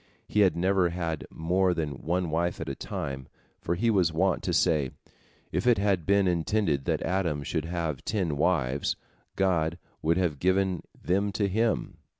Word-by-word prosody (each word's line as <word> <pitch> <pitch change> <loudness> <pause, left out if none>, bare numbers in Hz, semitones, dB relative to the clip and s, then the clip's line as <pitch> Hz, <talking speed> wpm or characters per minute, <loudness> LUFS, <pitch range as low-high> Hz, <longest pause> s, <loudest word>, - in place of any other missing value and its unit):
He 105 - 0
had 95 -5 +5
never 90 0 +2
had 85 -2 -3
more 90 +3 +1
than 75 -5 -3
one 85 0 -1
wife 85 +2 0
at - - -4
a 70 - -2
time, 65 0 -5 0.3
for 85 - -1
he 115 +6 +2
was 90 -6 +3
wont 90 +3 +1
to - - -2
say, 75 -5 +2 0.6
"If 90 +8 -1
it 120 -3 +5
had 95 -5 +1
been 100 -1 +4
intended 85 -4 +1
that - - 0
Adam 85 -5 0
should 70 - -2
have 85 -5 -3
ten 95 -9 -1
wives, 70 -4 +1 0.4
God 85 -4 +1 0.2
would 85 +2 +2
have 85 -6 0
given 95 +1 +1 0.2
them 100 +3 0
to 100 0 +1
him. 110 +3 0
85 Hz, 170 wpm, -28 LUFS, 80-95 Hz, 0.6 s, had